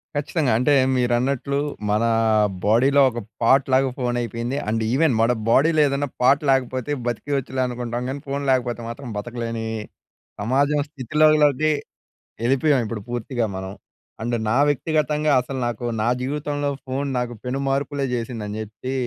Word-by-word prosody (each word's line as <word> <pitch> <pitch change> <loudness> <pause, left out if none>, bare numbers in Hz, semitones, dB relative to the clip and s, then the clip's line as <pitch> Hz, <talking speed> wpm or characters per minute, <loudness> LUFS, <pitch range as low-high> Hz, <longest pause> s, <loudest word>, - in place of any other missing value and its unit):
ఖచ్చితంగా. 145 -1 0
అంటే, 145 +4 +3 0.2
మీరన్నట్లు 125 +3 0 0.3
మనా 110 +3 +2 0.6
బాడీలో 130 +7 +4
ఒక 120 -1 -5 0.2
పార్ట్ 135 +4 +4
లాగా 135 0 +4
ఫోనైపోయింది. 120 +1 -2
అండ్ 110 +1 0
ఈవెన్ 140 +2 +3
మన 115 +2 +4 0.2
బాడీలో 155 +6 +4
ఏదన్న 140 +1 -1
పార్ట్ 135 +4 +4
లేకపోతే 130 0 0 0.2
బతికేయచ్చులే 130 +2 -2
అనుకుంటాం 120 0 -4
గానీ, 135 +2 -4
ఫోన్ 140 +1 -2
లేకపోతే 120 -2 0
మాత్రం 120 +2 -7
బతకలేనీ 115 +1 -4 0.7
సమాజం 140 +6 +2
స్థితిలోకి 150 +1 +3 0.7
ఎ‌ళ్ళిపోయాం 135 +3 +3
ఇప్పుడు 110 -2 -5
పూర్తిగా 120 0 -2
మనం. 95 0 -6 0.5
అండ్ 120 +1 -1
నా 115 - +2
వ్యక్తిగతంగా 150 +1 +1
అసలు 130 +1 -5
నాకు 120 0 -4 0.2
నా 115 - +2
జీవితంలో 145 +1 -2 0.2
ఫోన్ 135 +2 -2
నాకు 120 -1 -3
పెనుమార్పులే 135 +2 -1
చేసింది 115 -1 -4
అని 105 +1 -5
చెప్పీ 110 +5 -6
130 Hz, 130 wpm, -22 LUFS, 120-140 Hz, 0.7 s, బాడీలో